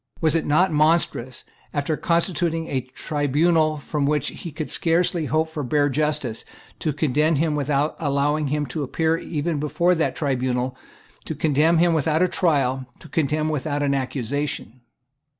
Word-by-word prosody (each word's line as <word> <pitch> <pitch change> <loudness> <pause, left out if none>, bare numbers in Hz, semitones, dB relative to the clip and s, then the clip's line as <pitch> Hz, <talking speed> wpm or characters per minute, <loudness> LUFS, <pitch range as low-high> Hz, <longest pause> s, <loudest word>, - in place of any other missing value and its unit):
Was 160 -2 +2
it 165 - 0
not 160 +4 +3
monstrous, 150 -5 +1 0.3
after 145 +2 0
constituting 170 0 0
a 135 -4 -1
tribunal 155 +4 +1
from 145 0 -2
which 150 -2 +1
he 170 - -8
could 155 +2 -5
scarcely 165 -1 +1
hope 155 +2 +1
for 160 -1 -5
bare 145 +2 +1
justice, 150 -5 -1 0.4
to 155 - 0
condemn 150 +2 +1
him 155 +2 +1
without 145 +1 0
allowing 145 0 +1
him 150 +1 -1
to 145 +4 -4
appear 160 +4 0
even 155 -1 -2
before 170 +4 +2
that 165 -2 0
tribunal, 130 -3 -1 0.5
to 160 - -4
condemn 155 +3 +3
him 170 0 +4
without 160 +2 +2
a - - +4
trial, 135 -8 +1
to - - -13
condemn 155 -1 0
him - - 0
without 145 0 -1
an 140 -1 +1
accusation? 130 -2 -3
150 Hz, 160 wpm, -23 LUFS, 140-160 Hz, 0.5 s, him